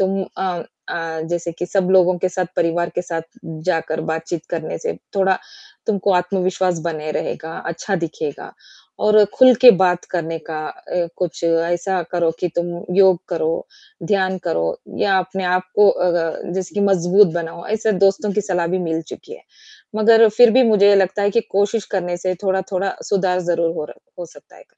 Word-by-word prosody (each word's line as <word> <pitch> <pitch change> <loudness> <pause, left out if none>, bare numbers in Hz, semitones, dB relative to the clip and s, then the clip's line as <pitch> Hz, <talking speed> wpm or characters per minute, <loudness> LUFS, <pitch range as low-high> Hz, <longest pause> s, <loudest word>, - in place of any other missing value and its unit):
तुम 195 0 0 0.2
अ 180 -3 -2 0.3
अ, 165 -1 -4
जैसे 175 0 -2
कि 175 - -3
सब 185 0 0
लोगों 185 -1 +4
के 185 +1 0
साथ, 185 0 -2
परिवार 170 +1 +1
के 175 - -1
साथ 165 -2 -4 0.4
जाकर 165 -3 -1
बातचीत 160 0 -5
करने 165 -2 -4
से - - -3 0.2
थोड़ा 190 -1 +2 0.5
तुमको 200 -2 +1
आत्मविश्वास 180 -1 0
बने 155 -2 -3
रहेगा, 160 +1 -4
अच्छा 170 +4 -3
दिखेगा 160 -4 -5 0.5
और 215 0 +6
खुल 255 -1 +7
के 250 - +12
बात 180 -1 +2
करने 165 -2 -3
का 155 - -3
अ, 175 -1 -4
कुछ 180 -2 -4
ऐसा 175 +3 0
करो 170 -2 +1
कि 180 - 0
तुम 175 - 0 0.3
योग 190 -3 +5
करो, 165 -2 -1 0.5
ध्यान 190 -2 0
करो 80 0 0 0.3
या 195 -1 +2
अपने 185 +1 -3
आपको 185 +3 +3
अ, 180 - 0 0.4
जैसे 185 -1 -4
कि - - +1
मज़बूत 190 0 +4
बनाओ। 170 0 -5
ऐसे 220 +1 0
दोस्तों 200 +1 0
की 210 - 0
सलाह 180 -3 -1
भी - - +1
मिल 160 0 -1
चुकी 455 - -10
है। - - -16 0.5
मगर 225 +1 +6
फ़िर 230 +3 +6
भी 260 +2 +5
मुझे 210 -3 +5
ये 205 - +6
लगता 190 +1 +1
है 205 - +2
कि 230 - +2
कोशिश 205 +2 0
करने 175 -3 -1
से 185 +1 -2
थोड़ा-थोड़ा 190 0 -1
सुधार 185 -2 +1
ज़रूर 170 -1 +1
हो 150 - -3
रह 175 - -12
सकता - - -18
है। - - -17
185 Hz, 175 wpm, -19 LUFS, 170-195 Hz, 0.5 s, के